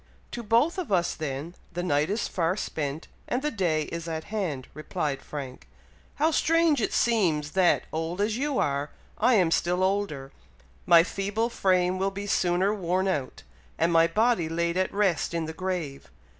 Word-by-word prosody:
"To 240 Hz, -, -5 dB
both 235 Hz, -, +2 dB
of 345 Hz, -, -5 dB
us, 175 Hz, -3 st, +2 dB
then, 150 Hz, +2 st, -5 dB, 0.2 s
the 175 Hz, +1 st, -3 dB
night 150 Hz, -2 st, +1 dB
is 210 Hz, +3 st, -1 dB
far 175 Hz, +2 st, 0 dB
spent, 150 Hz, -4 st, -4 dB, 0.2 s
and 255 Hz, +3 st, -1 dB
the 300 Hz, -, 0 dB
day 170 Hz, -7 st, 0 dB
is 170 Hz, +2 st, -6 dB
at 160 Hz, -1 st, -3 dB
hand," 175 Hz, -12 st, -3 dB
replied 150 Hz, -2 st, -3 dB
Frank 135 Hz, -4 st, -8 dB, 0.5 s
"How 315 Hz, +3 st, +2 dB
strange 325 Hz, -4 st, +3 dB
it -, -, 0 dB
seems, 170 Hz, -11 st, +1 dB
that, 185 Hz, -2 st, +3 dB
old 165 Hz, +3 st, -3 dB
as 210 Hz, +1 st, +1 dB
you 280 Hz, +2 st, -1 dB
are. 140 Hz, +1 st, 0 dB, 0.3 s
I 250 Hz, -, +4 dB
am 180 Hz, -5 st, +3 dB
still 180 Hz, +2 st, +1 dB
older; 185 Hz, -9 st, -1 dB, 0.6 s
my 170 Hz, -1 st, +8 dB
feeble 205 Hz, +5 st, -2 dB
frame 185 Hz, -3 st, +1 dB
will 195 Hz, +1 st, +1 dB
be 200 Hz, +1 st, -6 dB
sooner 185 Hz, 0 st, +1 dB
worn 185 Hz, -1 st, 0 dB
out, 145 Hz, -9 st, -3 dB, 0.3 s
and 170 Hz, -, +2 dB
my 165 Hz, 0 st, +5 dB
body 210 Hz, -2 st, +1 dB
laid 170 Hz, +1 st, -1 dB
at 185 Hz, 0 st, 0 dB
rest 180 Hz, -7 st, 0 dB
in 165 Hz, -1 st, -1 dB
the 160 Hz, -, -6 dB
grave! 175 Hz, -6 st, -4 dB
180 Hz, 175 wpm, -27 LUFS, 160-205 Hz, 0.6 s, my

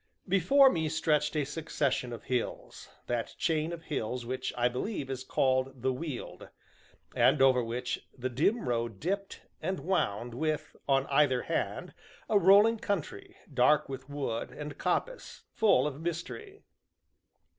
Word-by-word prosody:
Before 255 Hz, +9 st, +5 dB
me 160 Hz, -2 st, -1 dB
stretched 150 Hz, -1 st, +1 dB
a 150 Hz, -2 st, +1 dB
succession 145 Hz, -4 st, -2 dB
of 120 Hz, -, -7 dB
hills 125 Hz, -2 st, -4 dB, 0.2 s
that 120 Hz, -2 st, -3 dB
chain 160 Hz, 0 st, 0 dB
of 170 Hz, -1 st, -7 dB
hills 125 Hz, -5 st, -3 dB
which, 130 Hz, +2 st, -3 dB
I 120 Hz, 0 st, +3 dB
believe, 135 Hz, -, -3 dB
is 130 Hz, -1 st, -4 dB
called 130 Hz, -1 st, 0 dB
the 130 Hz, 0 st, +2 dB
Weald, 145 Hz, -1 st, -6 dB, 0.7 s
and 140 Hz, +2 st, +4 dB
over 130 Hz, -2 st, +5 dB
which 120 Hz, +2 st, -4 dB
the 130 Hz, 0 st, -2 dB
dim 160 Hz, -, +1 dB
road 115 Hz, -4 st, -1 dB
dipped, 195 Hz, +4 st, -3 dB, 0.2 s
and 185 Hz, +3 st, -2 dB
wound, 120 Hz, -, -1 dB
with, 155 Hz, +4 st, -2 dB
on 135 Hz, 0 st, +3 dB
either 140 Hz, -3 st, +2 dB
hand, -, -, -3 dB, 0.3 s
a 210 Hz, -, +4 dB
rolling 205 Hz, +5 st, +6 dB
country, 200 Hz, -8 st, -4 dB, 0.2 s
dark 135 Hz, +4 st, +4 dB
with 135 Hz, 0 st, -7 dB
wood, 140 Hz, -5 st, -3 dB
and 150 Hz, -1 st, -7 dB
coppice -, -, -2 dB
full 220 Hz, -8 st, +4 dB
of 150 Hz, 0 st, -4 dB
mystery. 280 Hz, -, -5 dB
145 Hz, 145 wpm, -30 LUFS, 125-170 Hz, 0.7 s, rolling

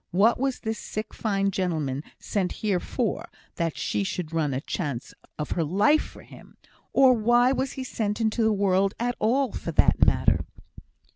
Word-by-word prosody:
What 210 Hz, +7 st, +3 dB
was 270 Hz, -1 st, -1 dB
this 220 Hz, -1 st, -3 dB
sick 215 Hz, +1 st, -6 dB
fine 195 Hz, -3 st, 0 dB
gentleman 155 Hz, -8 st, -1 dB, 0.2 s
sent 190 Hz, -3 st, -2 dB
here 195 Hz, -4 st, +2 dB
for, 230 Hz, +3 st, -3 dB, 0.3 s
that 165 Hz, -2 st, -1 dB
she -, -, -1 dB
should 180 Hz, -5 st, -4 dB
run 155 Hz, -3 st, 0 dB
a 130 Hz, -, -1 dB
chance 140 Hz, -4 st, -4 dB, 0.2 s
of 150 Hz, -, -4 dB
her 170 Hz, -, +1 dB
life 205 Hz, -, +3 dB
for -, -, -11 dB
him? -, -, -16 dB, 0.3 s
or 265 Hz, -2 st, +6 dB
why 240 Hz, +2 st, +4 dB
was 265 Hz, 0 st, -1 dB
he 265 Hz, -, -5 dB
sent 215 Hz, -4 st, -2 dB
into 225 Hz, +1 st, 0 dB
the 220 Hz, 0 st, +3 dB
world 195 Hz, -1 st, +2 dB
at 245 Hz, +1 st, -1 dB
all, 255 Hz, +5 st, +2 dB
for -, -, -5 dB
that -, -, +4 dB
matter?" -, -, +3 dB
205 Hz, 180 wpm, -26 LUFS, 180-240 Hz, 0.3 s, or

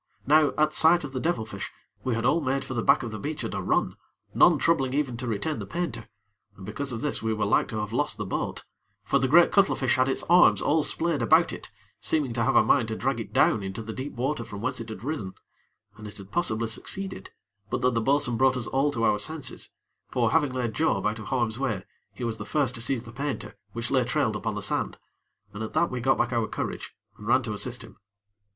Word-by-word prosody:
Now, 150 Hz, +1 st, +4 dB
at 155 Hz, 0 st, +3 dB
sight 170 Hz, +1 st, +5 dB
of 145 Hz, -, -6 dB
the 130 Hz, -, -3 dB
devil 145 Hz, -7 st, -1 dB
fish, -, -, -6 dB, 0.3 s
we 125 Hz, -3 st, 0 dB
had 115 Hz, +1 st, -2 dB
all 160 Hz, +6 st, +3 dB
made 135 Hz, -1 st, -1 dB
for 130 Hz, -, -5 dB
the 115 Hz, -, -1 dB
back -, -, +4 dB
of 115 Hz, -, -5 dB
the 110 Hz, -, -6 dB
beach 150 Hz, +6 st, -4 dB
at -, -, -4 dB
a -, -, -2 dB
run, -, -, 0 dB, 0.4 s
none -, -, +6 dB
troubling 135 Hz, -5 st, +1 dB
even 140 Hz, -5 st, 0 dB
to 125 Hz, +1 st, -5 dB
retain 115 Hz, +8 st, -2 dB
the -, -, -6 dB
painter, 175 Hz, 0 st, -4 dB, 0.5 s
and 95 Hz, -, -10 dB
because 135 Hz, +7 st, -4 dB
of 115 Hz, -1 st, -4 dB
this, 150 Hz, -, -1 dB
we 110 Hz, 0 st, 0 dB
were 110 Hz, -, 0 dB
like 100 Hz, -, +2 dB
to 110 Hz, -, -5 dB
have 105 Hz, 0 st, -3 dB
lost 145 Hz, +5 st, 0 dB
the 105 Hz, -, -4 dB
boat; 95 Hz, -, -3 dB, 0.4 s
for 140 Hz, -, +2 dB
the 130 Hz, -, +1 dB
great 170 Hz, +5 st, +6 dB
cuttlefish 195 Hz, -11 st, +3 dB
had 130 Hz, +1 st, +3 dB
its 135 Hz, -, -1 dB
arms 175 Hz, +1 st, +6 dB
all 155 Hz, +2 st, +2 dB
splayed 160 Hz, -1 st, -1 dB
about 115 Hz, -, +4 dB
it, -, -, -8 dB, 0.3 s
seeming 145 Hz, -6 st, 0 dB
to 115 Hz, -, -1 dB
have -, -, +2 dB
a -, -, +7 dB
mind -, -, +3 dB
to -, -, -3 dB
drag -, -, -1 dB
it -, -, -6 dB
down 110 Hz, -, +3 dB
into 95 Hz, +3 st, -5 dB
the 110 Hz, +1 st, -6 dB
deep 135 Hz, +4 st, -5 dB
water 130 Hz, +1 st, -2 dB
from 105 Hz, -2 st, -8 dB
whence 130 Hz, +3 st, -2 dB
it 115 Hz, -, -8 dB
had 110 Hz, -, -8 dB
risen, 125 Hz, -10 st, -4 dB, 0.6 s
and 105 Hz, -1 st, -9 dB
it 105 Hz, -, -11 dB
had 100 Hz, -1 st, -12 dB
possibly 115 Hz, -10 st, 0 dB
succeeded, 190 Hz, -, -5 dB, 0.4 s
but -, -, -2 dB
that 125 Hz, 0 st, +3 dB
the 115 Hz, -, +1 dB
bo'sun 135 Hz, -1 st, +1 dB
brought 130 Hz, 0 st, +3 dB
us 120 Hz, -, -3 dB
all 135 Hz, +2 st, +1 dB
to 115 Hz, -5 st, -2 dB
our 105 Hz, -2 st, +3 dB
senses; 145 Hz, +3 st, -4 dB, 0.4 s
for, 120 Hz, -3 st, +1 dB
having 150 Hz, -4 st, +2 dB
laid 125 Hz, -3 st, -2 dB
Job 160 Hz, +8 st, +1 dB
out 105 Hz, +1 st, 0 dB
of 110 Hz, -, -8 dB
harm's 120 Hz, -1 st, -1 dB
way, 105 Hz, -8 st, -2 dB, 0.3 s
he 105 Hz, +5 st, -8 dB
was 115 Hz, -2 st, -2 dB
the -, -, -4 dB
first 135 Hz, +3 st, 0 dB
to 115 Hz, -, -7 dB
seize 125 Hz, -1 st, -1 dB
the 115 Hz, -, -10 dB
painter, 140 Hz, -2 st, -4 dB, 0.2 s
which 115 Hz, +1 st, -4 dB
lay 130 Hz, -2 st, +3 dB
trailed 120 Hz, -, 0 dB
upon -, -, -3 dB
the -, -, -4 dB
sand, -, -, 0 dB, 0.6 s
and, 105 Hz, -, -7 dB
at 110 Hz, -, -5 dB
that, 170 Hz, +2 st, +2 dB
we 125 Hz, -1 st, -3 dB
got 135 Hz, +2 st, +3 dB
back 120 Hz, -, 0 dB
our 115 Hz, -2 st, +1 dB
courage -, -, -5 dB, 0.2 s
and -, -, -9 dB
ran -, -, +4 dB
to -, -, -3 dB
assist -, -, -4 dB
him. -, -, -14 dB
125 Hz, 250 wpm, -26 LUFS, 110-145 Hz, 0.6 s, a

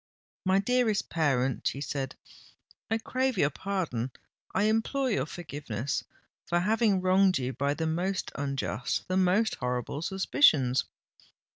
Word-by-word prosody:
"My 190 Hz, +1 st, +4 dB
dearest 220 Hz, 0 st, +1 dB
parent," 135 Hz, -6 st, +1 dB
she 135 Hz, -, -2 dB
said, 135 Hz, -2 st, -3 dB, 0.7 s
"I 225 Hz, -, +2 dB
crave 255 Hz, +1 st, -1 dB
your 145 Hz, -4 st, +3 dB
pardon—I 170 Hz, -, -4 dB
implore 225 Hz, +5 st, +1 dB
your 140 Hz, -8 st, 0 dB
forgiveness, 145 Hz, -8 st, -4 dB, 0.4 s
for 175 Hz, -, +2 dB
having 210 Hz, 0 st, +2 dB
wronged 185 Hz, -1 st, +4 dB
you 130 Hz, 0 st, -2 dB
by 140 Hz, +2 st, 0 dB
the 160 Hz, -, -2 dB
most 180 Hz, +4 st, -1 dB
unjust—the 140 Hz, +5 st, -2 dB
most 190 Hz, +4 st, +3 dB
horrible 125 Hz, +3 st, -2 dB
suspicions! 165 Hz, -, +3 dB
175 Hz, 120 wpm, -29 LUFS, 135-200 Hz, 0.7 s, My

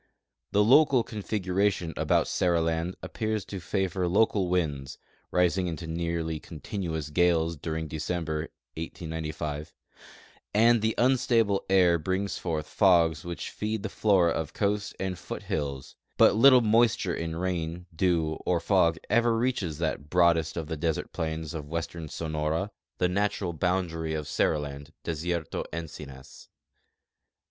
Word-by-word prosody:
The 105 Hz, -, +4 dB
local 130 Hz, +1 st, +5 dB
configuration 100 Hz, -4 st, -1 dB
about -, -, +2 dB
Seriland 85 Hz, 0 st, 0 dB
appears 110 Hz, -3 st, -2 dB
to 100 Hz, -, -6 dB
favor 95 Hz, -1 st, -1 dB
local 100 Hz, 0 st, +2 dB
winds 75 Hz, -6 st, -1 dB, 0.3 s
(rising 90 Hz, +1 st, +2 dB
into 85 Hz, -1 st, -4 dB
nearly 80 Hz, -1 st, -2 dB
continuous 80 Hz, -2 st, -5 dB
gales 85 Hz, 0 st, +2 dB
during 80 Hz, +1 st, -4 dB
De 80 Hz, -, -5 dB
ceml)er, 80 Hz, -1 st, -2 dB, 0.3 s
1895), 80 Hz, -2 st, -5 dB, 0.8 s
and 115 Hz, +1 st, +5 dB
the 110 Hz, +1 st, +1 dB
unstable 120 Hz, -5 st, +3 dB
air 90 Hz, -3 st, +5 dB
brings 95 Hz, +5 st, -2 dB
forth 80 Hz, -4 st, -2 dB
fogs 85 Hz, -6 st, +3 dB
which 85 Hz, -1 st, -5 dB
feed 105 Hz, -1 st, -3 dB
the 110 Hz, -, -2 dB
flora 95 Hz, -6 st, +3 dB
of 80 Hz, -2 st, -3 dB
coast 100 Hz, -1 st, -1 dB
and 95 Hz, -2 st, -3 dB
foothills; 70 Hz, -5 st, -4 dB, 0.2 s
but -, -, +6 dB
little 130 Hz, +2 st, +7 dB
moisture 110 Hz, -4 st, +3 dB
in 80 Hz, -1 st, -3 dB
rain, 85 Hz, -1 st, -3 dB
dew, 80 Hz, -3 st, +1 dB
or 90 Hz, -2 st, +1 dB
fog 85 Hz, -2 st, +3 dB
ever 120 Hz, -1 st, +3 dB
reaches 115 Hz, -, -1 dB
that 80 Hz, -3 st, -3 dB
broadest 85 Hz, -2 st, +3 dB
of 80 Hz, -, -2 dB
the 80 Hz, 0 st, -4 dB
desert 80 Hz, +1 st, -2 dB
plains 80 Hz, 0 st, -3 dB
of 75 Hz, -3 st, -6 dB
western 85 Hz, -1 st, -4 dB
Sonora, 80 Hz, +5 st, -2 dB, 0.3 s
the 90 Hz, -, +2 dB
natural 100 Hz, -1 st, -1 dB
boundary 85 Hz, -2 st, -1 dB
of 75 Hz, -1 st, -3 dB
Seriland, 70 Hz, 0 st, -1 dB
Desierto 85 Hz, 0 st, -2 dB
Encinas. 75 Hz, -5 st, -8 dB
85 Hz, 130 wpm, -28 LUFS, 80-100 Hz, 0.8 s, little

